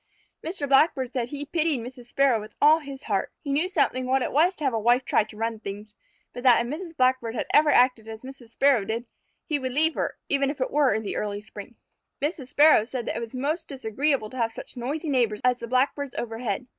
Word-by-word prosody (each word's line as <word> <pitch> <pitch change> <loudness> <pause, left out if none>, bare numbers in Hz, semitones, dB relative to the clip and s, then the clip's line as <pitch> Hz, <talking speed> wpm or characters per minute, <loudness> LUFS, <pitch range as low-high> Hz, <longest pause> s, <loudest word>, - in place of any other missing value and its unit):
Mr. 320 -3 -3
Blackbird 270 -2 +3
said 245 -3 -1
he 290 +2 -5
pitied 310 -2 0
Mr. 245 +2 -9
Sparrow 250 -1 +2
with 215 0 -11
all 310 +2 +6
his 280 -3 -9
heart. 200 -3 -1
He 280 -3 -2
knew 320 +6 +1
something 255 -8 0
what 260 0 +2
it - - -3
was 340 +7 +3
to 305 - -8
have 270 -3 +1
a 225 - 0
wife 240 +4 +2
try - - +3
to 215 -1 -14
run 225 0 -2
things, 210 +1 -8 0.4
but 245 - -7
that 245 -2 +5
if 245 - -4
Mrs. 330 0 -8
Blackbird 255 -2 +1
had - - -2
ever 300 0 +5
acted 250 -5 +3
as 220 +1 -9
Mrs. 260 -3 -11
Sparrow 265 -2 +3
did, 225 +4 -3 0.4
he 300 -2 -1
would 260 -1 -4
leave 315 +3 +4
her, - - -3
even 275 -1 +1
if 285 - -5
it 255 - -1
were 290 -2 +3
in 220 - -2
the 205 - -4
early 205 -1 -3
spring. 210 +2 -11 0.4
Mr. 290 -2 -3
Sparrow 290 -3 +5
said 240 +1 -5
it - - -2
was 235 +1 -7
most 305 +6 -2
disagreeable 265 -2 -1
to 260 - -9
have 230 -2 0
such 225 - -9
noisy 280 +7 -4
neighbors 235 -5 +1
as 250 0 +3
the 235 - -7
Blackbirds 265 +2 0
overhead. 230 -1 -3
255 Hz, 230 wpm, -25 LUFS, 230-285 Hz, 0.4 s, all